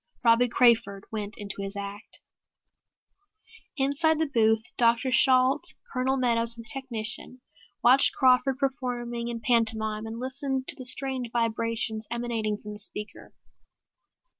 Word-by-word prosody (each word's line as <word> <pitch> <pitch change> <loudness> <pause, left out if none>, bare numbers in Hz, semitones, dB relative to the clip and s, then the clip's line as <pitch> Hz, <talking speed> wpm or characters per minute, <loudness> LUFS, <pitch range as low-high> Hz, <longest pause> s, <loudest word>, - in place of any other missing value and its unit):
Robbie 235 +1 +4
Crawford 225 -5 +2
went 210 -1 -5
into 200 -1 -5
his 195 +1 -5
act. 200 +2 -8 1.6
Inside 285 +4 +1
the 320 - +1
booth 220 -5 +2
Dr. 235 +2 +2
Shalt, 255 0 +3 0.2
Colonel 265 +1 0
Meadows 235 -2 +1
and 230 - -10
a - - 0
technician 250 -1 -2 0.4
watched 255 +3 +5
Crawford 260 +1 +3
performing 245 -4 -3
in 235 -1 -5
pantomime 220 -2 +1
and 225 +1 -7
listened 265 +1 -3
to - - +5
the 260 -4 -8
strange 255 -1 -2
vibrations 230 -1 -1
emanating 230 -3 -2
from 210 - -9
the 210 - -7
speaker. 210 0 -7
235 Hz, 130 wpm, -26 LUFS, 220-260 Hz, 1.6 s, watched